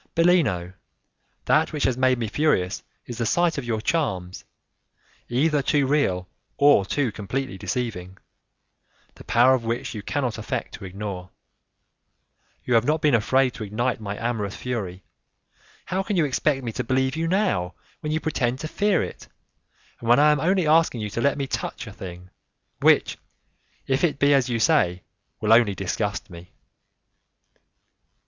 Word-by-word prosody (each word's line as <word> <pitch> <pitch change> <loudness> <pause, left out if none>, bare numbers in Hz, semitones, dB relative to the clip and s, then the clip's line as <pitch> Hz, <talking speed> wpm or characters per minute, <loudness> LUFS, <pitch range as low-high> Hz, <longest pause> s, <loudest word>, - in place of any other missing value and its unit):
"Bellino, 150 - +2 0.7
that 155 +1 +3
which 150 -2 -2
has 130 - +2
made 130 0 +2
me 115 -2 -2
furious 105 -7 0 0.2
is 120 -1 -7
the 115 - 0
sight 170 0 +2
of - - -6
your 115 -2 -1
charms, 95 - -2 0.8
either 145 +4 +2
too 145 0 +2
real 115 -11 +1 0.3
or 140 -9 +5
too 135 -1 0
completely 125 +5 -4
deceiving, 95 -2 -4 1.0
the - - -14
power 120 +3 +4
of 130 -3 0
which 120 +4 -3
you 105 - -5
cannot 125 0 -2
affect 115 +2 -4
to 100 - -8
ignore. 95 -1 -6 1.3
You 125 - -1
have 115 -1 +5
not 155 +4 +1
been 150 -3 +4
afraid 130 +3 +3
to 115 - -7
ignite 110 +3 -2
my 100 -1 -5
amorous 110 -4 -2
fury, 100 -7 -5 0.8
how 185 +1 -1
can 195 0 -2
you 165 - +3
expect 135 0 0
me 115 - -3
to - - -3
believe 130 +2 0
you 165 +1 -1
now, 180 - 0 0.2
when 150 - -4
you 155 - 0
pretend 130 -6 -1
to 155 - -3
fear 205 +3 +1
it, - - -8 0.7
and 115 - -5
when 120 - +7
I 150 +1 +6
am 150 - +1
only 185 +3 +2
asking 155 -6 +3
you 105 -1 -4
to 115 - -3
let 140 +2 +2
me 140 - -1
touch - - -4
a - - -9
thing, 90 0 -10 0.5
which, - - +3 0.7
if 135 +3 0
it 160 -5 +2
be 140 +1 +4
as 135 -3 +2
you 120 - 0
say, 90 -4 +2 0.4
will 110 +1 +3
only 115 -4 +4
disgust 100 +2 -3
me?" 85 +1 -11
125 Hz, 165 wpm, -24 LUFS, 105-145 Hz, 1.3 s, when